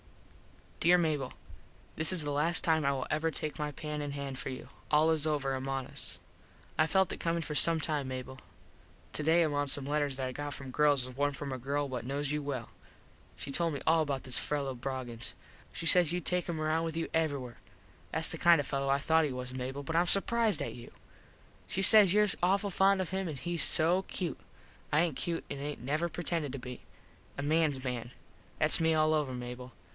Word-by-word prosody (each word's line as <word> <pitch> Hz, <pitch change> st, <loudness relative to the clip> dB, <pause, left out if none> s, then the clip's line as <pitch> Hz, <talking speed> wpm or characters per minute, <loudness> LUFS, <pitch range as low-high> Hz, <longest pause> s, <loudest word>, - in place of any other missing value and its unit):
_ -, -, -3 dB
Dere 175 Hz, +2 st, +6 dB
Mable: 155 Hz, -6 st, 0 dB, 0.6 s
This 160 Hz, +2 st, +3 dB
is 180 Hz, -4 st, +4 dB
the 145 Hz, -, -2 dB
last 155 Hz, +4 st, +1 dB
time 160 Hz, -2 st, +2 dB
I 140 Hz, -, +2 dB
will 135 Hz, -2 st, -2 dB
ever 155 Hz, +1 st, +1 dB
take 155 Hz, 0 st, -5 dB
my 150 Hz, 0 st, -2 dB
pen 150 Hz, +1 st, -5 dB
in 145 Hz, -1 st, -4 dB
hand 140 Hz, -2 st, -5 dB
for -, -, -4 dB
you. 130 Hz, -, -7 dB, 0.2 s
All 155 Hz, +2 st, +4 dB
is 160 Hz, -1 st, +1 dB
over 140 Hz, -3 st, 0 dB
among 135 Hz, 0 st, -3 dB
us. -, -, -7 dB, 0.6 s
I 155 Hz, -, +3 dB
felt 190 Hz, +2 st, +2 dB
it -, -, -7 dB
comin 165 Hz, 0 st, -1 dB
for 150 Hz, -, -5 dB
some 165 Hz, +2 st, +4 dB
time 150 Hz, -3 st, -1 dB
Mable. 130 Hz, 0 st, -6 dB, 0.7 s
Today 160 Hz, +3 st, +3 dB
among 145 Hz, -2 st, 0 dB
some 135 Hz, 0 st, -1 dB
letters 145 Hz, -2 st, 0 dB
that 130 Hz, -, -2 dB
I 130 Hz, -, -3 dB
got 145 Hz, +1 st, -5 dB
from 135 Hz, -1 st, -8 dB
girls 145 Hz, -2 st, +3 dB
was 130 Hz, -1 st, -10 dB
one 145 Hz, +1 st, 0 dB
from 140 Hz, 0 st, -6 dB
a 130 Hz, -, -5 dB
girl 140 Hz, +3 st, -1 dB
what 125 Hz, -3 st, -4 dB
knos 140 Hz, +3 st, -2 dB
you 150 Hz, 0 st, -1 dB
well. 135 Hz, -5 st, -4 dB, 0.7 s
She 140 Hz, -, -7 dB
told 165 Hz, +1 st, +1 dB
me 140 Hz, -, -5 dB
all 160 Hz, 0 st, +4 dB
about 140 Hz, -3 st, -2 dB
this 130 Hz, -, +3 dB
fello 140 Hz, -2 st, -2 dB
Broggins. 125 Hz, -2 st, -5 dB, 0.4 s
She 170 Hz, -, -6 dB
says 170 Hz, 0 st, +5 dB
you 175 Hz, -, 0 dB
take 180 Hz, +1 st, -1 dB
him 165 Hz, -2 st, -2 dB
around 155 Hz, +1 st, 0 dB
with 165 Hz, 0 st, -4 dB
you 165 Hz, -, -1 dB
everywhere. 140 Hz, -7 st, -1 dB, 0.5 s
Thats 160 Hz, 0 st, 0 dB
the 165 Hz, -, -2 dB
kind 170 Hz, -2 st, +6 dB
of 145 Hz, -, -1 dB
a -, -, -9 dB
fello 135 Hz, 0 st, -1 dB
I 135 Hz, -, +4 dB
thought 160 Hz, +3 st, +3 dB
he 145 Hz, -, -2 dB
was, 125 Hz, 0 st, -5 dB
Mable, 130 Hz, +2 st, -4 dB
but 160 Hz, +4 st, -4 dB
Im 175 Hz, +1 st, +3 dB
surprized 220 Hz, +3 st, +3 dB
at -, -, -5 dB
you. 120 Hz, -1 st, -11 dB, 0.8 s
She 195 Hz, -, -1 dB
says 205 Hz, -3 st, +8 dB
your 210 Hz, +2 st, +4 dB, 0.2 s
awful 195 Hz, +3 st, +2 dB
fond 195 Hz, +1 st, +3 dB
of 185 Hz, -, -3 dB
him 190 Hz, 0 st, -2 dB
hes 170 Hz, +3 st, -3 dB
so 170 Hz, +3 st, +4 dB
cute. 175 Hz, -7 st, -4 dB, 0.5 s
I 150 Hz, -, +4 dB
aint 165 Hz, -5 st, 0 dB
cute 170 Hz, +3 st, -3 dB
an 140 Hz, -, -4 dB
aint 145 Hz, -3 st, -5 dB
never 155 Hz, +6 st, -1 dB
pretended 165 Hz, -4 st, -3 dB
to -, -, -4 dB
be. 125 Hz, 0 st, -8 dB, 0.6 s
A 140 Hz, -, -3 dB
mans 150 Hz, -3 st, +1 dB
man. 120 Hz, -2 st, -3 dB, 0.5 s
Thats -, -, +3 dB
me 160 Hz, -1 st, +3 dB
all 155 Hz, 0 st, +3 dB
over, 150 Hz, -4 st, 0 dB
Mable. 125 Hz, 0 st, -7 dB
150 Hz, 220 wpm, -31 LUFS, 135-165 Hz, 0.8 s, says